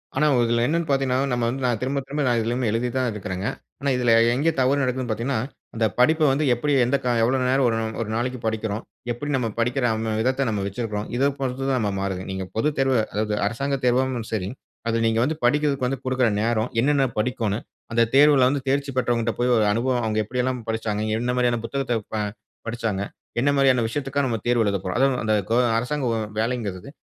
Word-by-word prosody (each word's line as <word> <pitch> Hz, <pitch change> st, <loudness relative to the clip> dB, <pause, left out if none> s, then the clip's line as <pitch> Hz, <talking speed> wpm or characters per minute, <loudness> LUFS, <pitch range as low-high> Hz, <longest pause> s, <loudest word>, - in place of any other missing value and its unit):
ஆனா 150 Hz, +3 st, +2 dB, 0.2 s
இதுல 115 Hz, 0 st, +1 dB
என்னனு 170 Hz, +1 st, 0 dB
பாத்தீங்கனா, 135 Hz, -2 st, +1 dB
நம்ம 120 Hz, -1 st, 0 dB
வந்து 130 Hz, +2 st, -4 dB
நா 125 Hz, -, +2 dB
திரும்ப 135 Hz, +2 st, -1 dB
திரும்ப 145 Hz, +2 st, -2 dB
நா 120 Hz, -, +3 dB
இதிலயுமே 120 Hz, +2 st, -1 dB
எழுதி 115 Hz, +3 st, 0 dB
தான் 130 Hz, -2 st, +1 dB
இருக்கிறேங்க. 95 Hz, -1 st, -4 dB, 0.3 s
ஆனா 140 Hz, +2 st, -1 dB
இதில 120 Hz, -2 st, +2 dB, 0.2 s
எங்க 145 Hz, +6 st, +2 dB
தவறு 135 Hz, +2 st, +3 dB
நடக்குதுனு 130 Hz, -1 st, -1 dB
பாத்தீங்கனா, 115 Hz, +3 st, -1 dB, 0.4 s
அந்த 115 Hz, 0 st, +1 dB
படிப்ப 155 Hz, +6 st, +4 dB
வந்து 140 Hz, +3 st, +1 dB
எப்படி 145 Hz, +5 st, 0 dB
எந்த 135 Hz, +3 st, +2 dB
கா 125 Hz, -, +2 dB
எவ்வளோ 130 Hz, +3 st, +2 dB
நேரம் 135 Hz, +1 st, +3 dB, 0.4 s
ஒரு 115 Hz, -, -3 dB
நாளைக்கு 125 Hz, +2 st, -2 dB
படிக்கிறோம்? 110 Hz, -1 st, -2 dB, 0.3 s
எப்படி 120 Hz, +5 st, -4 dB
நம்ம 125 Hz, -3 st, 0 dB
படிக்கிற 125 Hz, +2 st, +1 dB
அந்த 110 Hz, 0 st, -2 dB
விதத்த 130 Hz, +3 st, +1 dB
நம்ம 105 Hz, -2 st, -1 dB
வச்சிருக்கிறோம்? 105 Hz, 0 st, -4 dB
இத 135 Hz, +3 st, +3 dB
பொறுத்து 135 Hz, 0 st, -2 dB
தான் 130 Hz, -4 st, +1 dB
ம -, -, -1 dB
மாறுதுங்க. 95 Hz, -1 st, -3 dB
நீங்க 95 Hz, 0 st, -4 dB
பொதுத்தேர்வ, 135 Hz, +2 st, +1 dB, 0.2 s
அதாவது 105 Hz, 0 st, -1 dB
அரசாங்க 140 Hz, +5 st, -1 dB
தேர்வும் 125 Hz, -2 st, +1 dB
சரி, 100 Hz, -4 st, -2 dB, 0.4 s
அதில 115 Hz, 0 st, +1 dB
நீங்க 115 Hz, 0 st, +1 dB
வந்து 155 Hz, +5 st, 0 dB
படிக்றதுக்கு 140 Hz, 0 st, +2 dB
வந்து 135 Hz, -1 st, -3 dB
குடுக்கிற 130 Hz, -1 st, +2 dB
நேரம், 115 Hz, +1 st, 0 dB
என்னென்ன 140 Hz, 0 st, +3 dB
படிக்கோணும்? 110 Hz, -2 st, -1 dB, 0.3 s
அந்த 115 Hz, 0 st, +4 dB
தேர்வுல 140 Hz, -2 st, +6 dB
வந்து 140 Hz, +1 st, -1 dB
தேர்ச்சி 140 Hz, +1 st, 0 dB
பெற்றவங்கட்ட 120 Hz, -2 st, +1 dB
போய் 125 Hz, 0 st, +3 dB
ஒரு 110 Hz, -, +3 dB
அனுபவம், 120 Hz, +2 st, 0 dB
அவுங்க 110 Hz, -1 st, 0 dB
எப்படியெல்லாம் 125 Hz, +2 st, -1 dB
படிச்சாங்க? 110 Hz, -2 st, -2 dB, 0.2 s
என்ன 125 Hz, +1 st, -1 dB
மாரியான 120 Hz, -1 st, +2 dB
புத்தகத்த 125 Hz, -2 st, -1 dB
ப -, -, -1 dB, 0.5 s
படிச்சாங்க? 115 Hz, -4 st, -2 dB, 0.4 s
என்ன 135 Hz, +4 st, +2 dB
மாரியான 130 Hz, -3 st, +4 dB
விஷயத்துக்காக 140 Hz, +3 st, -1 dB
நம்ம 115 Hz, -3 st, -1 dB
தேர்வு 120 Hz, -1 st, +3 dB
எழுதப்போறோம்? 95 Hz, -2 st, -1 dB
அதாவது 135 Hz, -1 st, +3 dB
அந்த 110 Hz, 0 st, +1 dB, 0.2 s
கொ 115 Hz, -, +2 dB, 0.2 s
அரசாங்க 130 Hz, +4 st, -1 dB, 0.3 s
வேலைங்கிறது, 110 Hz, -3 st, -2 dB
125 Hz, 190 wpm, -23 LUFS, 115-135 Hz, 0.5 s, தேர்வுல